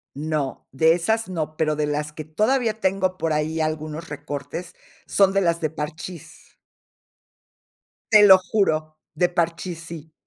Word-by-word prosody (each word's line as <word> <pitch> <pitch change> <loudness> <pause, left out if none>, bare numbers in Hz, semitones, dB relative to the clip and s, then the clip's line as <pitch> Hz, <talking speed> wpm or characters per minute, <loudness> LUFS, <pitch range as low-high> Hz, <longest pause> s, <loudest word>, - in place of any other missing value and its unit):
No, 150 -2 -3
de 160 +4 +4
esas 220 +5 0
no. 155 -3 -4
Pero 155 -1 0
de 150 -1 0
las 150 +1 -2
que 155 0 -7
todavía 220 - 0
tengo 190 -1 0
por 165 -1 0
ahí 155 +1 -1
algunos 155 +1 -3
recortes, 145 +4 -6 0.3
son 195 -1 +3
de 195 - +2
las 170 -2 +1
de 155 -2 -1
Parchís. 160 +1 -8 1.6
Te 210 -1 +8
lo 190 -1 +9
juro, 160 -6 0 0.2
de 175 +3 +2
Parchís 170 0 -2
sí. 160 -2 -10
160 Hz, 145 wpm, -23 LUFS, 155-185 Hz, 1.6 s, lo